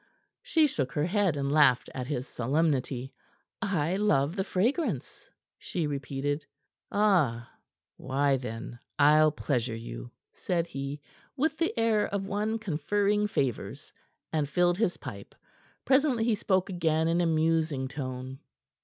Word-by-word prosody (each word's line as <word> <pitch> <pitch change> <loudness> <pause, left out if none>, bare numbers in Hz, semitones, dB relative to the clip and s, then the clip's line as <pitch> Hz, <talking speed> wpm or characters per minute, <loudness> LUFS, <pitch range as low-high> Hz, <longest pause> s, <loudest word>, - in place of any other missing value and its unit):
She 340 -11 +3
shook 140 - -2
her 150 - +1
head, 185 -4 +1
and 140 0 -1
laughed 145 -5 +4
at 125 -1 -4
his 130 -2 -3
solemnity. 135 -1 -1 0.5
"I 185 -4 0
love 175 -7 +2
the 190 - 0
fragrance," 235 - -1 0.3
she 170 -3 -2
repeated. 145 +1 -2 0.5
"Ah! 165 - +2 0.5
Why, 135 +1 +1
then, 120 -1 -7 0.2
I'll 150 +1 +6
pleasure 125 -6 -1
you," - - -7 0.2
said 170 -2 -1
he, 140 -2 -5 0.4
with 310 +4 +1
the 335 -6 0
air 225 -2 +2
of 200 -1 -3
one 210 +3 -1
conferring 205 +2 0
favors, 135 - -3 0.4
and 150 -3 0
filled 175 +3 +2
his 220 -6 +1
pipe. - - -9 0.5
Presently 265 -4 +3
he 230 0 +2
spoke 190 -2 +1
again 160 -2 +1
in 170 +1 +2
a 170 - +2
musing 160 -4 +1
tone. 130 -1 -6
155 Hz, 135 wpm, -29 LUFS, 135-200 Hz, 0.5 s, I'll